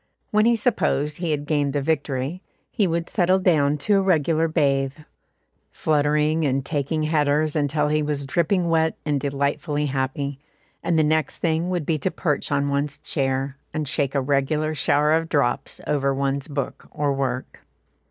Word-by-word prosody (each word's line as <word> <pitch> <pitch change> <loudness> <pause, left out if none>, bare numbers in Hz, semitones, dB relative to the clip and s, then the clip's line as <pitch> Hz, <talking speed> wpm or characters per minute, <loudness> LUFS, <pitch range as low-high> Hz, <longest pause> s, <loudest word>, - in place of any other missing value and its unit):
When 215 +1 +4
he 235 - +4
supposed 150 - 0
he 170 -1 -3
had 150 -1 -1
gained 145 -2 0
the 145 - +1
victory, 145 +1 -1 0.3
he 205 - +1
would 170 0 -1
settle 185 -1 +2
down 150 -6 +2
to 205 -1 +4
a - - +3
regular 165 -3 +2
bathe, 140 -4 +1 0.7
fluttering 150 +1 +1
and 135 -1 0
taking 155 +1 -1
headers 155 0 +1
until 150 0 +1
he 155 +1 +1
was 145 -2 -2
dripping 170 +5 +1
wet 160 -1 +1
and 145 -2 0
delightfully 145 +2 -1
happy, 135 0 -2 0.4
and 170 - +1
the 155 - +4
next 155 -1 +1
thing 165 +1 0
would 175 -4 -1
be 155 -1 0
to 185 - 0
perch 150 -6 -2
on 140 0 +1
one's 140 +1 -1
chair, 135 -1 -2 0.2
and 155 -1 -2
shake 140 +1 -1
a 140 - +2
regular 145 +3 0
shower 150 +1 +2
of 165 0 +1
drops 140 -5 0
over 140 -2 +1
one's 135 0 -1
books 140 -2 -4
or 145 -1 -1
work. 130 -2 -3
150 Hz, 170 wpm, -23 LUFS, 140-160 Hz, 0.7 s, When